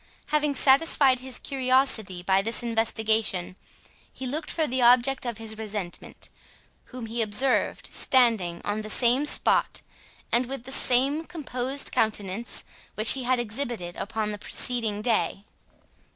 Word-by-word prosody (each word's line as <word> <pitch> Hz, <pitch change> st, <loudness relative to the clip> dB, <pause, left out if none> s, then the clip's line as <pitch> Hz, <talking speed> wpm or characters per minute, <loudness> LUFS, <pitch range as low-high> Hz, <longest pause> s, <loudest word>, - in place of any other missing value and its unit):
Having 300 Hz, -1 st, 0 dB
satisfied 270 Hz, -1 st, +4 dB
his 255 Hz, 0 st, -4 dB
curiosity 255 Hz, -8 st, 0 dB
by 190 Hz, +1 st, +2 dB
this 225 Hz, +3 st, +1 dB
investigation, 220 Hz, -5 st, -1 dB, 0.6 s
he 265 Hz, -, -8 dB
looked 300 Hz, +5 st, -4 dB
for 320 Hz, -, 0 dB
the 260 Hz, -2 st, -2 dB
object 250 Hz, +2 st, +3 dB
of 235 Hz, -3 st, -4 dB
his 220 Hz, -1 st, -3 dB
resentment, 205 Hz, -5 st, -7 dB, 0.6 s
whom 250 Hz, -2 st, -9 dB
he 230 Hz, +1 st, -3 dB
observed 225 Hz, +5 st, +1 dB
standing 225 Hz, -10 st, +2 dB
on 205 Hz, +1 st, -2 dB
the 215 Hz, -, -8 dB
same 245 Hz, +5 st, +3 dB
spot, -, -, +3 dB, 0.5 s
and 240 Hz, +1 st, +1 dB
with 270 Hz, -2 st, -7 dB
the 265 Hz, -, -8 dB
same 270 Hz, +5 st, +3 dB
composed 275 Hz, -5 st, -3 dB
countenance 215 Hz, +1 st, -2 dB, 0.3 s
which 215 Hz, +1 st, +4 dB
he 265 Hz, -2 st, -1 dB
had 255 Hz, +1 st, +1 dB
exhibited 235 Hz, -6 st, -4 dB
upon 215 Hz, +1 st, -4 dB
the 210 Hz, -, -7 dB
preceding 220 Hz, -2 st, -3 dB
day. 220 Hz, -4 st, -1 dB
240 Hz, 135 wpm, -25 LUFS, 215-265 Hz, 0.6 s, satisfied